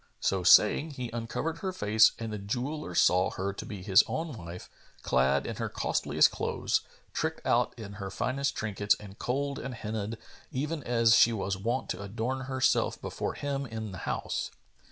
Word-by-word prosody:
So 95 Hz, -1 st, +1 dB
saying, 120 Hz, -, +5 dB
he 125 Hz, -2 st, -4 dB
uncovered 120 Hz, +8 st, -3 dB
her 190 Hz, +2 st, -2 dB
face 110 Hz, -, +4 dB
and 115 Hz, -2 st, -5 dB
the 105 Hz, -, -4 dB
jeweller 120 Hz, -, -3 dB
saw 90 Hz, +1 st, +4 dB
her 95 Hz, +1 st, -3 dB
to -, -, -7 dB
be 100 Hz, -4 st, -7 dB
his 95 Hz, +2 st, +6 dB
own 160 Hz, -4 st, -3 dB
wife, 85 Hz, -3 st, -8 dB, 0.4 s
clad 65 Hz, +2 st, +2 dB
in -, -, -4 dB
her -, -, -2 dB
costliest -, -, +2 dB
clothes, -, -, 0 dB, 0.3 s
tricked -, -, -2 dB
out -, -, +2 dB
in 105 Hz, -3 st, -8 dB
her 95 Hz, -, -4 dB
finest 140 Hz, +7 st, -1 dB
trinkets 105 Hz, -1 st, +1 dB
and 100 Hz, -1 st, -12 dB
kohl'd 140 Hz, +2 st, -1 dB
and 125 Hz, -1 st, -5 dB
henna'd, 110 Hz, -1 st, -4 dB, 0.3 s
even 150 Hz, +4 st, -2 dB
as 115 Hz, -2 st, +4 dB
she 115 Hz, -, +6 dB
was 100 Hz, -2 st, -1 dB
wont 115 Hz, +7 st, -2 dB
to 90 Hz, -, -3 dB
adorn 115 Hz, +6 st, -3 dB
herself 130 Hz, -1 st, +1 dB
before -, -, -4 dB
him 140 Hz, -1 st, -3 dB
in 110 Hz, -2 st, -5 dB
the 95 Hz, -, -7 dB
house. -, -, -2 dB
110 Hz, 175 wpm, -29 LUFS, 100-130 Hz, 0.4 s, his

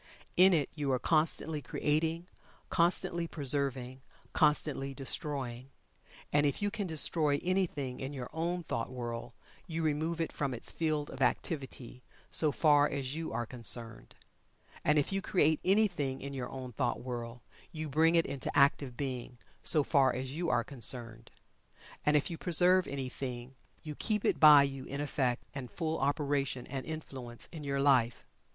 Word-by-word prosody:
In 185 Hz, +2 st, +7 dB
it 155 Hz, -6 st, +2 dB
you 145 Hz, -3 st, -2 dB
are 130 Hz, -, +2 dB
constantly 155 Hz, +1 st, +1 dB
creating 160 Hz, +4 st, -1 dB, 0.4 s
constantly 170 Hz, -1 st, +2 dB
preserving 135 Hz, -4 st, -1 dB, 0.3 s
constantly 140 Hz, -2 st, +1 dB
destroying. 135 Hz, -2 st, -2 dB, 0.6 s
And 145 Hz, 0 st, +4 dB
if 140 Hz, -, -1 dB
you 205 Hz, 0 st, -1 dB
can 200 Hz, -2 st, -3 dB
destroy 155 Hz, -2 st, +2 dB
anything 170 Hz, -9 st, -1 dB
in 135 Hz, +1 st, -4 dB
your 130 Hz, -4 st, -6 dB
own 170 Hz, +2 st, -2 dB
thought 115 Hz, -6 st, -3 dB
world 120 Hz, -1 st, -6 dB, 0.3 s
you 165 Hz, -1 st, -3 dB
remove 160 Hz, +2 st, -1 dB
it 165 Hz, -, -1 dB
from 140 Hz, -3 st, -2 dB
its 115 Hz, -, 0 dB
field 155 Hz, -3 st, -1 dB
of 135 Hz, -, -9 dB
activity, 130 Hz, -2 st, -2 dB, 0.3 s
so 155 Hz, -2 st, +4 dB
far 145 Hz, -1 st, +4 dB
as 135 Hz, -2 st, -3 dB
you 160 Hz, +1 st, -4 dB
are 120 Hz, -, -2 dB
concerned. 115 Hz, -1 st, -1 dB, 0.7 s
And 150 Hz, +1 st, +3 dB
if 145 Hz, -, +1 dB
you 195 Hz, 0 st, -1 dB
create 160 Hz, -6 st, +2 dB
anything 180 Hz, -9 st, +1 dB
in 140 Hz, 0 st, -6 dB
your 125 Hz, -2 st, -4 dB
own 130 Hz, -2 st, -7 dB
thought 120 Hz, 0 st, -1 dB
world, 120 Hz, -1 st, -6 dB, 0.3 s
you 155 Hz, -2 st, -5 dB
bring 160 Hz, +4 st, +3 dB
it 165 Hz, -, +4 dB
into 135 Hz, -1 st, -3 dB
active 140 Hz, -3 st, +3 dB
being, 130 Hz, -3 st, -5 dB, 0.2 s
so 150 Hz, -, +3 dB
far 135 Hz, -2 st, +3 dB
as 130 Hz, +1 st, -4 dB
you 165 Hz, +4 st, -2 dB
are -, -, +2 dB
concerned. 115 Hz, -3 st, -2 dB, 0.7 s
And 150 Hz, 0 st, +4 dB
if 145 Hz, -, -1 dB
you 165 Hz, -, -6 dB
preserve 180 Hz, +1 st, +4 dB
anything, 130 Hz, -2 st, -5 dB, 0.3 s
you 155 Hz, -1 st, -6 dB
keep 210 Hz, +6 st, -2 dB
it -, -, +1 dB
by 150 Hz, -2 st, +9 dB
you 135 Hz, -1 st, -4 dB
in 140 Hz, -, -5 dB
effect 135 Hz, -4 st, -1 dB
and 135 Hz, -4 st, -6 dB
full 160 Hz, +1 st, -3 dB
operation 140 Hz, -2 st, -1 dB
and 135 Hz, +1 st, -6 dB
influence 130 Hz, -7 st, -5 dB
in 160 Hz, -3 st, -8 dB
your 140 Hz, -1 st, -1 dB
life. 130 Hz, -4 st, +3 dB
140 Hz, 160 wpm, -32 LUFS, 130-160 Hz, 0.7 s, by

